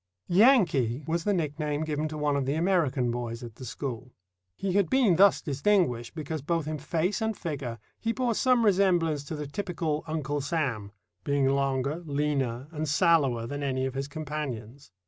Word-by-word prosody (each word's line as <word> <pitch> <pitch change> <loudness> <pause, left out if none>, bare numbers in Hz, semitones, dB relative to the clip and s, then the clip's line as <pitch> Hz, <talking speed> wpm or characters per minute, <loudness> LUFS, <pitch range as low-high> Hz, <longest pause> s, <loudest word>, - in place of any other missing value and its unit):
"Yankee" 175 - +4
was 165 +1 -1
the 205 - +2
nickname 150 -3 -1
given 155 0 -1
to 155 0 -6
one 150 -1 +1
of 135 -2 -1
the 140 - 0
American 160 -8 +1
boys 120 0 -4
at 115 -2 -9
the 130 - -8
school. 125 0 -5 0.4
He 190 - -2
had 200 -2 +2
been 250 -9 +4
thus 200 +1 +5
distinguished 145 - +1
because 155 -1 -4
both 165 +1 -1
in 155 -1 -3
face 180 - -1
and 220 -1 -1
figure 140 -8 -4 0.2
he 230 - -1
bore 245 -1 0
some 250 0 +3
resemblance 175 -7 +3
to 155 - -5
the 150 0 -4
typical 160 -1 -3
Uncle 150 -2 -2
Sam, 135 -9 -2 0.3
being 140 -1 +1
longer, 140 +3 0
leaner, 140 -4 -1
and 155 -1 -3
sallower 145 -8 +3
than 145 +4 -5
any 130 -2 -1
of 130 - -3
his 135 +1 -3
companions. 140 -5 -6
150 Hz, 175 wpm, -28 LUFS, 135-170 Hz, 0.4 s, thus